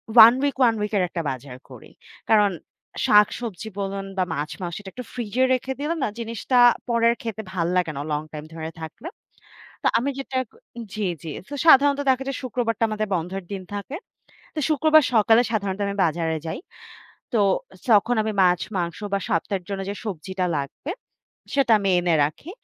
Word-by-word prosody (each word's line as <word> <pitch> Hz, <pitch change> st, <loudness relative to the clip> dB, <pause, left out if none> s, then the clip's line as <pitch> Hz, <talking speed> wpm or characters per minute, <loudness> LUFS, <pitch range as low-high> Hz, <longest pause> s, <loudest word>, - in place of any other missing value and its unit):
One 230 Hz, 0 st, +11 dB
week 285 Hz, -1 st, 0 dB
one 230 Hz, -2 st, +5 dB
week 210 Hz, -, -2 dB
এর 185 Hz, -, +3 dB
একটা 170 Hz, -, -3 dB
বাজার 130 Hz, 0 st, -8 dB
করি। -, -, -13 dB, 0.4 s
কারণ 210 Hz, -2 st, +5 dB, 0.5 s
শাকসবজি 210 Hz, 0 st, +2 dB
বলুন 195 Hz, 0 st, -3 dB
বা 185 Hz, -, +3 dB
মাছ, 145 Hz, +2 st, -3 dB
মাংস 175 Hz, -2 st, -4 dB
এটা 195 Hz, -, -9 dB
একটু 250 Hz, -, -6 dB
ফ্রিজে 240 Hz, +1 st, -1 dB
রেখে 260 Hz, +1 st, -1 dB
দিলে 300 Hz, +4 st, -1 dB
না -, -, +2 dB
জিনিসটা 230 Hz, +2 st, -1 dB, 0.3 s
পরে 235 Hz, -1 st, +2 dB
আর -, -, -1 dB
খেতে 220 Hz, -1 st, -4 dB
ভাল্লাগে 175 Hz, -1 st, 0 dB
না -, -, -3 dB
লং 150 Hz, 0 st, 0 dB
টাইম 150 Hz, -1 st, -7 dB
ধরে 160 Hz, -1 st, -5 dB
থাকলে। 160 Hz, -, -8 dB, 0.8 s
তো -, -, -1 dB
আমি 275 Hz, +4 st, -1 dB
যেটা 270 Hz, -1 st, -3 dB, 0.6 s
জ্বি, 215 Hz, -2 st, -1 dB, 0.2 s
জ্বি। 160 Hz, -, -6 dB, 0.2 s
তো 290 Hz, -, -6 dB
সাধারণত 285 Hz, -1 st, +6 dB
দেখা 260 Hz, +1 st, +2 dB
যায় 275 Hz, -, -2 dB
শুক্রবারটা 235 Hz, -2 st, -1 dB
আমাদের 215 Hz, 0 st, -2 dB
বন্ধের 180 Hz, +2 st, -3 dB
দিন 195 Hz, -2 st, -4 dB
থাকে। 205 Hz, +9 st, -5 dB, 0.6 s
তো -, -, -5 dB
শুক্রবার 310 Hz, +1 st, +5 dB
সকালে 225 Hz, +2 st, +5 dB
সাধারণত 200 Hz, -2 st, -1 dB
আমি 200 Hz, -, -2 dB
বাজারে 160 Hz, -1 st, 0 dB
যাই। -, -, -4 dB, 0.7 s
তো 235 Hz, -, +2 dB, 0.5 s
যখন 225 Hz, +2 st, +4 dB
আমি 220 Hz, -, -2 dB
মাছ, 180 Hz, -1 st, +4 dB, 0.2 s
মাংস 170 Hz, -2 st, -2 dB
বা 200 Hz, -, +2 dB
সপ্তাহের 185 Hz, +2 st, -1 dB
জন্য 200 Hz, -1 st, -3 dB
যে -, -, -3 dB
সবজিটা 190 Hz, -1 st, -3 dB
লাগবে 140 Hz, -, -6 dB, 0.6 s
সেটা 275 Hz, -5 st, +3 dB
আমি 195 Hz, -1 st, 0 dB
এনে 175 Hz, -1 st, +2 dB
রাখি। 155 Hz, -, -5 dB
205 Hz, 175 wpm, -24 LUFS, 180-245 Hz, 0.8 s, One